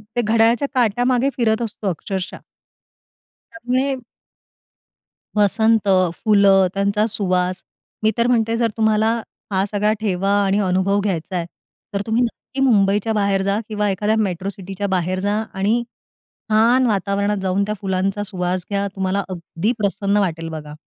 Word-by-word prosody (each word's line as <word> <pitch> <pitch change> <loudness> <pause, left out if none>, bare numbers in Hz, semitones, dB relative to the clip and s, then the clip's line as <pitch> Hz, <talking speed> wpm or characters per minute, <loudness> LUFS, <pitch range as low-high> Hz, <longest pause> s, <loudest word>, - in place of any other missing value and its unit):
ते 240 - +2
घड्याळाच्या 230 +4 +3
काट्यामागे 245 +2 +2
फिरत 225 -2 +1
असतो 220 -2 -4
अक्षरशः! 185 +2 -4 1.2
त्यामुळे 270 -3 -1 1.4
वसंत, 215 +1 +3 0.3
फुलं, 200 -1 +4
त्यांचा 200 +2 +1
सुवास. 185 -3 -1 0.4
मी 220 - +4
तर 235 - +3
म्हणते 230 -2 +2
जर 230 -1 +1
तुम्हाला, 220 0 +2 0.4
हा 190 0 +2
सगळा 210 +1 +1
ठेवा 195 -2 0
आणि 195 +1 +1
अनुभव 190 +1 +1
घ्यायचाय, 180 -2 -2 0.5
तर 200 - 0
तुम्ही 225 +2 +1
नक्की 245 +3 -4
मुंबईच्या 210 -3 +3
बाहेर 200 -2 +1
जा 200 +1 0
किंवा 210 -1 -1
एखाद्या 210 +3 0
मेट्रो 190 -3 -1
सिटीच्या 195 +1 -5
बाहेर 185 0 0
जा 205 +2 0 0.2
आणि 210 +5 +1 0.7
छान 235 +4 +4
वातावरणात 200 0 0
जाऊन 190 +1 +1
त्या 210 - -2
फुलांचा 195 +1 -1
सुवास 180 -2 -2
घ्या, 200 0 -1
तुम्हाला 190 +1 -1
अगदी 180 +3 -2
प्रसन्न 200 0 0
वाटेल 165 -5 -1
बघा. 150 -2 -7
200 Hz, 135 wpm, -20 LUFS, 190-220 Hz, 1.4 s, फुलं